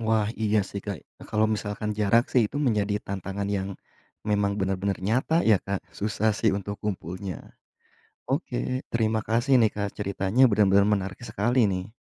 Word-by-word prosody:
Wah, 110 -2 +1
iya 110 0 +3
sih, 100 - -5
Kak, 100 -4 -3
eee, - - -17
kalau 110 0 +2
misalkan 105 0 -4
jarak 115 +4 +4
sih, 125 - +5
itu 145 - -7
menjadi 105 -3 +1
tantangan 100 +1 -4
yang 95 0 -3 0.6
memang 100 -1 +2
benar-benar 95 +1 -1
nyata 125 - +1
ya, 105 - +7
Kak, 100 -1 -2 0.2
susah 105 +1 +1
sih 110 - +2
untuk 100 +1 -5
kumpulnya. 90 -2 -5 0.7
Oke, 130 -2 -1
terima 110 -1 +1
kasih 120 +5 +1
nih, 110 - +5
Kak, 100 -1 -2
ceritanya 100 +4 0
benar-benar 100 -1 +4
menarik 95 -1 -1
sekali 120 +2 +1
nih. 95 +1 -3
105 Hz, 160 wpm, -26 LUFS, 100-110 Hz, 0.7 s, ya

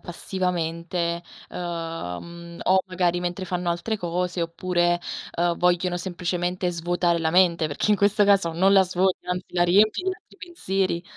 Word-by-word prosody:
passivamente, 170 -1 -2 0.3
ehm, 165 - -5
uhm, 170 0 -11
o 190 0 +4
magari 180 -1 +1
mentre 180 +1 -3
fanno 180 -1 -2
altre 175 +6 -2
cose 180 -1 -2
oppure, 175 +1 0 0.4
uhm, 170 0 +2
vogliono 180 0 +1
semplicemente 180 0 -2
svuotare 175 0 0
la 160 - +1
mente, 170 -2 +3
perché 150 +8 -1
in 210 - +5
questo 205 +1 +3
caso 195 -5 +3
non 190 +4 +3
la 195 - +7
svuoti, 185 0 0
anzi 180 0 -3
la 175 - +3
riempi 205 - +4
di 375 - -1
altri - - -22
pensieri. 195 - -2
175 Hz, 155 wpm, -24 LUFS, 170-185 Hz, 0.4 s, la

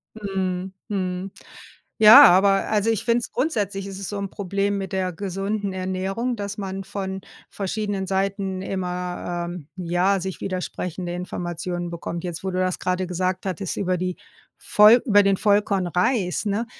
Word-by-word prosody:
Mhm. 190 -3 -3 0.2
Mhm. 185 -2 -3 0.7
Ja, 215 0 +10
aber, 195 +2 +5
also, 215 0 +1
ich 225 -1 -1
finde 235 0 +3
es 235 - -7
grundsätzlich 205 - -1
ist 195 0 -7
es 195 - -5
so 205 - -4
'n 200 -1 -3
Problem 200 +1 -1
mit 195 -2 -5
der 185 -1 -1
gesunden 200 +3 -3
Ernährung, 190 +6 -2
dass 205 -2 -5
man 195 -1 -4
von 190 -1 -5 0.3
verschiedenen 200 0 -3
Seiten 195 0 -1
immer, 180 -2 -3
ähm, 175 -5 -8
ja, 180 +2 +1
sich 190 0 -5
widersprechende 180 -1 -4
Informationen 175 0 -4
bekommt. 170 +1 -5
Jetzt, 175 0 -5
wo 190 - -2
du 180 - -3
das 185 -1 0
grade 185 0 -1
gesagt 185 +1 -2
hattest, 190 -1 -3
über 185 -2 0
die 180 0 -3 0.4
Voll 215 +3 +6
über 205 -5 +6
den 195 0 +3
Vollkornreis, 200 -1 +1
ne? 210 +3 0
190 Hz, 155 wpm, -23 LUFS, 180-200 Hz, 0.7 s, Ja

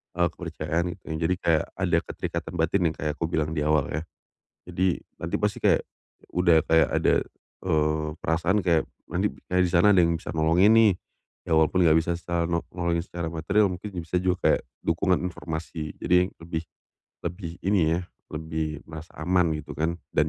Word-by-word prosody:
e 90 - -2
kepercayaan 85 0 -3
gitu. 95 - -29
Ya - - -2
jadi 90 - +1
kayak, 80 -2 +3
ada - - +1
keterikatan 85 -1 -4
batin, 85 +3 +1
yang - - -11
kayak 75 -1 -2
aku 80 - -1
bilang 80 -2 -1
di 80 - -2
awal 75 -2 +2
ya. 75 - -2 0.6
Jadi, 95 -1 0 0.2
nanti - - -2
pasti - - -1
kayak - - +3 0.5
udah 85 -2 +4
kayak 80 0 +4
ada, - - +3 0.5
eee, 75 -2 +1
perasaan 85 +5 +1
kayak 85 -3 +3 0.3
nanti - - +1 0.2
kayak 90 0 +3
di 90 - -1
sana 85 +4 +5
ada 95 - +6
yang 85 0 +2
bisa 80 - -7
nolongin 85 +6 +4
nih. 115 -2 +6 0.5
Ya - - 0
walaupun 80 +4 +3
enggak 80 0 +6
bisa 85 +2 -1
secara 85 -1 -1
no 85 0 0
nolongin 85 -1 0
secara 85 -2 -5
materil, 95 +5 +2
mungkin 90 0 -5
bisa 80 +2 -2
juga 90 0 +1
kayak - - +3 0.2
dukungan 90 +2 +2
informasi. 80 -2 -5
Jadi 90 +1 +3
lebih 85 -1 -4 0.6
lebih 85 0 -4
ini 85 -5 +3
ya, - - -2 0.3
lebih 80 -1 -3
merasa 80 +1 -9
aman 90 0 +2
gitu 75 - -9
kan, 80 +2 0 0.2
dan 75 +1 +2
85 Hz, 180 wpm, -26 LUFS, 80-90 Hz, 0.6 s, ada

